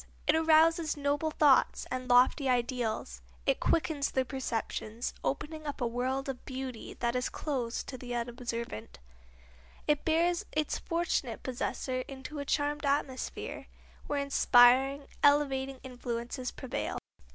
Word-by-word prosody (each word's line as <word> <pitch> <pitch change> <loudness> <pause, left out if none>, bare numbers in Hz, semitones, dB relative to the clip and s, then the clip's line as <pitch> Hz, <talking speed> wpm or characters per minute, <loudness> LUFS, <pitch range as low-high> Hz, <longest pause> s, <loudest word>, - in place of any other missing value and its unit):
It - - +4
arouses 320 0 +4
noble 285 +2 0
thoughts 295 -3 +4
and 255 0 -3
lofty 255 +3 +5
ideals; 240 - -1 0.2
it - - +2
quickens 310 -3 +1
the 260 -1 0
perceptions, 235 -3 -3
opening 305 +2 -3
up 290 - -4
a 245 - 0
world 255 +3 -1
of 265 -2 -5
beauty 260 -3 -6
that 235 0 -1
is 250 0 0
closed 255 -6 -3
to 255 - -6
the 245 -1 -5
unobservant; 235 - -4 0.9
it 295 -1 +2
bears 335 +2 +2
its 305 -1 0
fortunate 330 -8 -1
possessor 255 0 -2
into 275 +2 -7
a 285 - -4
charmed 290 +1 0
atmosphere, 280 -2 -2 0.4
where 290 - -1
inspiring, 270 0 +5 0.2
elevating 270 -2 +3
influences 245 0 -4
prevail. 260 - -4
265 Hz, 130 wpm, -31 LUFS, 245-290 Hz, 0.9 s, lofty